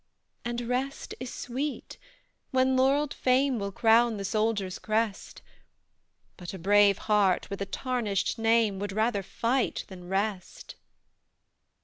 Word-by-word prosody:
"And 240 0 -3
rest 250 +3 -3
is 255 0 -6
sweet, 270 +4 -5 0.5
when 260 0 +2
laurelled 275 +3 +2
fame 260 -1 +2
Will 200 0 -3
crown 230 +2 +3
the 200 - -4
soldier's 215 -3 -1
crest; 215 -1 -2 0.9
But 180 +1 -7
a - - -6
brave 200 +2 +4
heart, 205 -3 +1
with 200 - -5
a 200 - -2
tarnished 230 -5 -2
name, 225 -3 +2
Would 200 -1 -4
rather 215 0 +1
fight 235 +6 -1
than 180 -2 -10
rest. 195 -1 -3
225 Hz, 125 wpm, -28 LUFS, 200-250 Hz, 0.9 s, brave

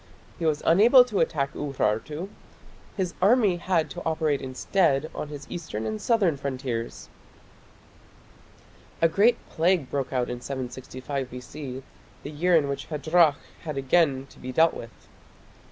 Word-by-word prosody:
He 165 - 0
was 150 -1 0
unable 235 +9 +7
to 215 -5 -2
attack 140 -3 0
Urartu. 145 - -2 0.7
His 185 -3 -1
army 205 -2 +4
had 170 -2 0
to 175 - -6
operate 155 -3 0
instead 140 +2 0
on - - -5
his 145 -1 -8
eastern 135 -11 -5
and 110 -1 -3
southern 200 - +2
frontiers. 130 -4 -4 1.9
A 165 - +5
great 215 +8 +3
plague 165 -4 +1
broke 140 -2 -2
out 125 -2 0
in 120 0 -5
765 130 +1 -5
B.C., 130 +1 -8 0.4
the 145 - -6
year 175 +4 +2
in 150 -3 +3
which 140 0 -4
Hadrach 155 0 +3 0.2
had 155 -3 -5
again 135 -1 +2
to - - -17
be 130 - -6
dealt 160 +5 +4
with. 115 -4 -11
150 Hz, 140 wpm, -26 LUFS, 130-175 Hz, 1.9 s, unable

